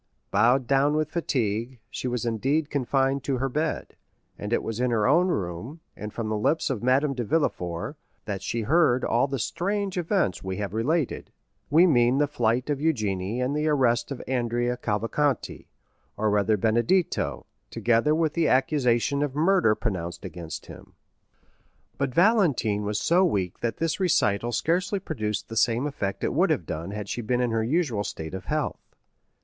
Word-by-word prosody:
Bowed 120 +6 +3
down 140 +3 +2
with 155 0 -1
fatigue, 120 -6 -1
she 135 - -4
was 125 -2 -2
indeed 135 +7 0
confined 135 0 +1
to 135 -2 -1
her 135 +2 0
bed; 155 +4 -2 0.4
and 105 - -6
it 120 - +1
was 115 0 -4
in 125 0 +1
her 110 -3 +1
own 170 +7 +4
room, 105 - -3 0.2
and 105 0 -7
from 115 0 -4
the 110 - -1
lips 155 +7 +1
of 125 - -3
Madame 135 +4 +2
de 125 -2 -3
Villefort, 105 - -1 0.3
that 100 -2 -4
she 115 - -2
heard 130 +1 +3
all 120 +4 +2
the 135 0 -3
strange 195 - -2
events 175 - 0
we 95 -1 -4
have 100 -2 -4
related; 140 +6 -1 0.4
we 165 +5 +6
mean 125 -5 +4
the 145 - +3
flight 125 -3 0
of 145 -2 -1
Eugénie 110 -8 -1
and 140 +3 -1
the 150 +1 0
arrest 125 -5 +2
of 140 - -6
Andrea 120 -1 0
Cavalcanti, 115 +4 -1 0.5
or 110 0 +1
rather 105 +1 +2
Benedetto, 120 - +1 0.2
together 120 +6 +2
with 160 -2 +1
the 165 -2 +1
accusation 130 0 +2
of 145 -2 -1
murder 165 - +3
pronounced 90 -8 -4
against 85 -3 -7
him. - - -13 1.1
But 140 -2 0
Valentine 165 - +3
was 105 0 -1
so 175 +3 +3
weak 95 - 0
that 115 -3 -2
this 165 +2 -1
recital 120 - +2
scarcely 180 - 0
produced 110 - -3
the 115 - -7
same 115 +4 +2
effect 100 -9 -3
it - - 0
would - - +3
have - - 0
done 80 +3 -5
had 105 0 -5
she 120 - -3
been 120 +2 0
in 125 -2 +1
her 115 0 +1
usual 125 -5 0
state 80 -4 -6
of 95 - -6
health. - - -3
125 Hz, 175 wpm, -26 LUFS, 110-150 Hz, 1.1 s, we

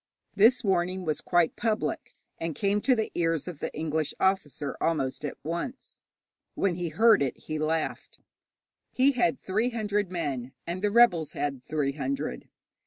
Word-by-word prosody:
This 230 +5 +5
warning 185 -1 0
was 155 -2 -1
quite 175 -2 +2
public, 220 -1 -2 0.2
and 165 -2 -3
came 200 +5 +1
to 260 +2 +3
the 220 -2 -2
ears 165 -2 0
of 170 -5 -6
the - - -3
English 155 -1 -2
officer 155 -7 0
almost 135 -5 0
at 145 - -4
once. 170 - -5 0.6
When 195 -3 +1
he 175 -1 -3
heard 220 +5 +5
it 135 -3 -1
he 155 0 -5
laughed. 155 +1 -2 0.7
He 265 +2 +4
had 235 - +1
three 215 +6 0
hundred 210 -4 -1
men, 140 -8 -3
and 175 +2 -4
the 205 - +2
rebels 200 -9 +4
had 140 -3 -2
three 145 -2 -1
hundred. 275 - -4
175 Hz, 160 wpm, -28 LUFS, 155-210 Hz, 0.7 s, This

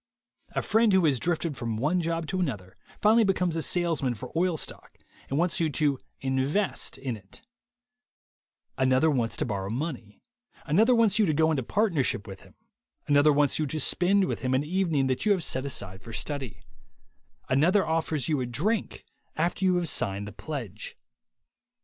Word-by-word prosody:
A - - 0
friend 220 -1 +3
who 190 -3 +4
has 140 -5 +2
drifted 165 -1 -1
from 115 -3 -3
one 155 +9 +1
job 165 0 -2
to 185 +5 -3
another, 105 - -3 0.3
finally 220 +2 +5
becomes 180 -4 0
a 165 - -1
salesman 160 -8 0
for 125 +3 -9
oil 175 0 +1
stock, - - -7 0.3
and 135 - -1
wants 170 +1 +1
you 165 -2 +1
to 145 -2 0 0.2
"invest" 135 +9 -1
in 130 -3 -4
it; 100 -2 -14 1.4
another 130 +4 +3
wants 120 -5 0
to - - -1
borrow 100 -4 -3
money; 120 -4 -5 0.5
another 220 +11 +4
wants 220 -2 +3
you 210 - +4
to 155 - +1
go 160 +1 +3
into 145 -4 0
partnership 160 - 0
with 95 -2 -10
him; - - -19 0.5
another 145 +1 +4
wants 145 0 +3
you 155 - 0
to 155 +3 -3
spend 190 +6 +3
with - - -3
him 130 0 0
an 135 - +1
evening 165 -4 0
that 130 -1 -1
you 205 - +6
have 185 -4 -2
set 130 -2 -1
aside 100 -7 -3
for 115 - -10
study; 135 -4 -4 0.8
another 170 +10 +3
offers 160 -3 -1
you 150 -4 0
a 125 - -2
drink 190 - -2 0.3
after 170 +4 -1
you 185 -1 +3
have 175 -1 0
signed 100 -7 +1
the - - -7
pledge. 120 - -7
150 Hz, 180 wpm, -27 LUFS, 130-175 Hz, 1.4 s, you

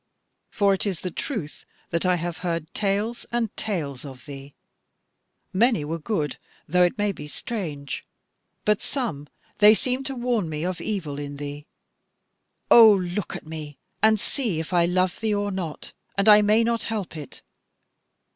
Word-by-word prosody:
For 200 -1 +3
it 195 - -1
is 185 -5 -2
the 180 - -3
truth 185 - -4 0.3
that 170 +2 +1
I 180 - +4
have 175 0 -4
heard 165 -2 -3
tales 210 +3 -1
and 235 -3 -1
tales 150 -11 -3
of 135 -3 -10
thee: 140 -1 -10 1.0
many 215 - +3
were 165 +2 -3
good, 155 - -2 0.3
though 180 +1 +3
it 175 +3 +3
maybe 205 -7 -2
strange; 150 - -4 0.6
but 210 -1 +3
some, 215 - -3 0.3
they 210 +1 +8
seemed 255 +3 0
to 270 - -4
warn 240 -7 0
me 155 +1 -3
of 185 -1 -3
evil 165 -10 -3
in 145 0 -6
thee. 145 +1 -7 1.0
O 225 -2 +10
look 185 0 -1
at - - -8
me, 155 -3 -7 0.2
and 220 0 +5
see 220 - -1
if 160 +3 -5
I 175 -1 +4
love 185 +1 +1
thee 220 -2 0
or 205 0 -1
not! 175 -5 -5 0.2
and 200 +1 +2
I 210 0 +9
may 215 +2 +4
not 230 0 +1
help 210 -7 -3
it. 150 -5 -9
185 Hz, 165 wpm, -25 LUFS, 155-215 Hz, 1.0 s, O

